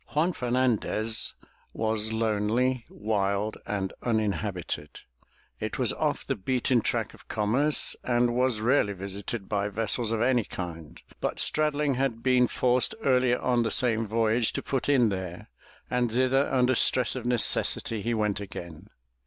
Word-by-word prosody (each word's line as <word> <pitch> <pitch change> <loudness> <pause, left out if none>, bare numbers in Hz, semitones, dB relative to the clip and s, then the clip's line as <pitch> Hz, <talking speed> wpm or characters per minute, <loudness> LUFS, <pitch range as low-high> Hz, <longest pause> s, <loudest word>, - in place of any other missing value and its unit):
Juan 165 +4 +2
Fernandez 120 -4 0 0.4
was 110 0 -1
lonely, 115 +3 0
wild 105 0 -1
and 95 -2 -2
uninhabited. 100 -9 -2 0.6
It - - -4
was - - +2
off - - -2
the - - -1
beaten 125 +3 0
track - - -2
of - - -18
commerce 125 +8 +2
and 120 -1 +1
was 125 -3 +1
rarely 115 -3 +2
visited 100 +2 -5
by 100 -1 -1
vessels 110 +2 0
of 115 - 0
any 120 0 +2
kind, 85 -6 -8 0.2
but - - -2
Straddling 150 -2 +2
had 125 -4 -1
been 125 -1 +4
forced 125 - +1
earlier 125 -2 +3
on 125 -1 +1
the 115 - 0
same 115 -3 +3
voyage 115 +1 +1
to - - -3
put 135 0 -2
in 125 -6 +4
there, 95 -7 -6 0.4
and 125 -2 0
thither 130 +3 +2
under 130 -1 +3
stress 125 +1 +2
of - - -4
necessity 115 -2 +2
he 115 +3 -1
went 105 -2 0
again. 85 -5 -9
115 Hz, 145 wpm, -27 LUFS, 105-125 Hz, 0.6 s, been